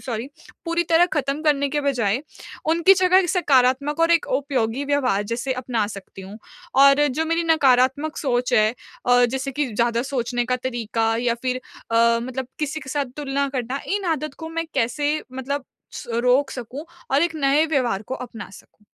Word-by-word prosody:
Sorry, 235 Hz, +2 st, -4 dB, 0.4 s
पूरी 335 Hz, 0 st, 0 dB
तरह 335 Hz, +2 st, +5 dB
ख़त्म 280 Hz, +1 st, -1 dB
करने 285 Hz, -2 st, +2 dB
के 295 Hz, -, 0 dB
बजाय 250 Hz, -4 st, 0 dB, 0.5 s
उनकी 340 Hz, +4 st, +5 dB
जगह 370 Hz, -1 st, +3 dB
एक 365 Hz, -3 st, +1 dB
सकारात्मक 285 Hz, -3 st, +2 dB
और 330 Hz, 0 st, +3 dB
एक 335 Hz, -, +2 dB
उपयोगी 270 Hz, -2 st, -1 dB
व्यवहार 265 Hz, -8 st, +1 dB
जैसे 245 Hz, +3 st, -1 dB
अपना 235 Hz, -4 st, -1 dB
सकती 195 Hz, -2 st, -10 dB
हूँ। 195 Hz, +3 st, -10 dB, 0.4 s
और 280 Hz, +1 st, +6 dB
जो 295 Hz, +4 st, -1 dB
मेरी 330 Hz, +1 st, +1 dB
नकारात्मक 285 Hz, -1 st, +3 dB
सोच 250 Hz, -3 st, -1 dB
है 215 Hz, 0 st, +4 dB, 0.4 s
अ, 245 Hz, 0 st, +5 dB
जैसे 265 Hz, +3 st, -2 dB
कि 290 Hz, +2 st, -1 dB
ज़्यादा 235 Hz, +1 st, +1 dB
सोचने 245 Hz, -2 st, -2 dB
का 250 Hz, 0 st, +1 dB
तरीका 230 Hz, -3 st, -1 dB
या 240 Hz, -1 st, +1 dB
फिर 255 Hz, 0 st, -1 dB, 0.3 s
अ, 230 Hz, 0 st, +4 dB
मतलब 255 Hz, +1 st, -5 dB
किसी 305 Hz, +1 st, -2 dB
के 265 Hz, -, -11 dB
साथ 275 Hz, -3 st, -2 dB
तुलना 280 Hz, -1 st, -1 dB
करना, 255 Hz, +3 st, -3 dB
इन 400 Hz, 0 st, -1 dB
आदत 305 Hz, -2 st, -6 dB
को 320 Hz, -, -6 dB
मैं 330 Hz, 0 st, -3 dB
कैसे 275 Hz, +4 st, 0 dB, 0.2 s
मतलब 265 Hz, +2 st, -4 dB, 0.3 s
स -, -, -8 dB, 0.2 s
रोक 255 Hz, +3 st, +3 dB
सकूँ 255 Hz, +5 st, -7 dB, 0.3 s
और 275 Hz, +3 st, +3 dB
एक 340 Hz, -1 st, 0 dB
नए 290 Hz, +2 st, +3 dB
व्यवहार 250 Hz, -10 st, 0 dB
को 260 Hz, -, -2 dB
अपना 230 Hz, -5 st, -8 dB
सकूँ? 210 Hz, +1 st, -17 dB
270 Hz, 180 wpm, -22 LUFS, 245-295 Hz, 0.5 s, और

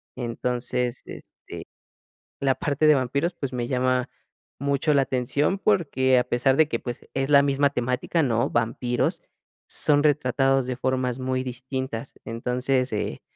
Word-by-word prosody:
Entonces, 125 Hz, +1 st, -2 dB
este, -, -, -11 dB, 1.1 s
la 135 Hz, -1 st, +2 dB
parte 150 Hz, +1 st, +1 dB
de 150 Hz, -, +7 dB
vampiros, 140 Hz, +6 st, 0 dB
pues, 135 Hz, -2 st, -5 dB
me 120 Hz, -1 st, -2 dB
llama 130 Hz, 0 st, 0 dB, 0.5 s
mucho 140 Hz, +2 st, +1 dB
la 140 Hz, -, +4 dB
atención, 135 Hz, +8 st, 0 dB
porque 140 Hz, -10 st, +2 dB
a 125 Hz, -, +4 dB
pesar 130 Hz, +2 st, +1 dB
de 160 Hz, -, +5 dB
que, 115 Hz, -, -2 dB
pues, 120 Hz, -1 st, -7 dB
es 135 Hz, +1 st, -1 dB
la 140 Hz, -1 st, +6 dB
misma 140 Hz, 0 st, +2 dB
temática, 130 Hz, +5 st, -1 dB
¿no? 115 Hz, -3 st, +1 dB
Vampiros, 120 Hz, +1 st, -1 dB, 0.5 s
son 145 Hz, -1 st, +2 dB
retratados 135 Hz, -2 st, +2 dB
de 130 Hz, -, -2 dB
formas 130 Hz, 0 st, -1 dB
muy 130 Hz, 0 st, -1 dB
distintas, 130 Hz, 0 st, -5 dB
entonces, 125 Hz, +3 st, -1 dB
eh, 105 Hz, -, -3 dB
130 Hz, 145 wpm, -25 LUFS, 125-140 Hz, 1.1 s, de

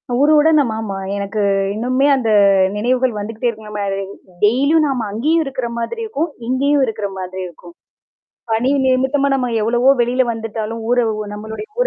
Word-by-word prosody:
ஊருவுடன் 305 Hz, +3 st, +4 dB
நம் 260 Hz, -6 st, +1 dB
ஆமா. 215 Hz, -3 st, -4 dB, 0.2 s
எனக்கு 200 Hz, +1 st, -3 dB, 0.3 s
இன்னுமே 255 Hz, +5 st, +1 dB
அந்த 245 Hz, -4 st, -1 dB, 0.5 s
நினைவுகள் 245 Hz, +2 st, 0 dB
வந்துகிட்டே 220 Hz, +3 st, -3 dB
இருக்கலம 210 Hz, -2 st, -6 dB, 0.6 s
டெய்லியும் 280 Hz, +9 st, +3 dB
நாம 250 Hz, -6 st, -2 dB
அங்கேயும் 310 Hz, +10 st, +1 dB
இருக்கிற 260 Hz, -3 st, -3 dB
மாதிரி 460 Hz, -, -4 dB
இருக்கும். 340 Hz, -7 st, -2 dB, 0.2 s
இங்கேயும் 280 Hz, +3 st, +2 dB
இருக்கிற 215 Hz, -3 st, -3 dB
மாதிரி 185 Hz, 0 st, -6 dB
இருக்கும். 175 Hz, 0 st, -14 dB, 0.8 s
பணி 235 Hz, +4 st, +1 dB
நிமித்தமா 265 Hz, +2 st, +2 dB
நம்ம 250 Hz, -2 st, 0 dB
எவ்வளவோ 240 Hz, +4 st, +3 dB
வெளியில 245 Hz, +2 st, +2 dB
வந்துட்டாலும், 225 Hz, 0 st, -5 dB
ஊர 245 Hz, 0 st, +3 dB, 0.3 s
நம்மளுடைய 220 Hz, -, -7 dB
ஊர -, -, +3 dB
245 Hz, 140 wpm, -18 LUFS, 220-275 Hz, 0.8 s, ஊருவுடன்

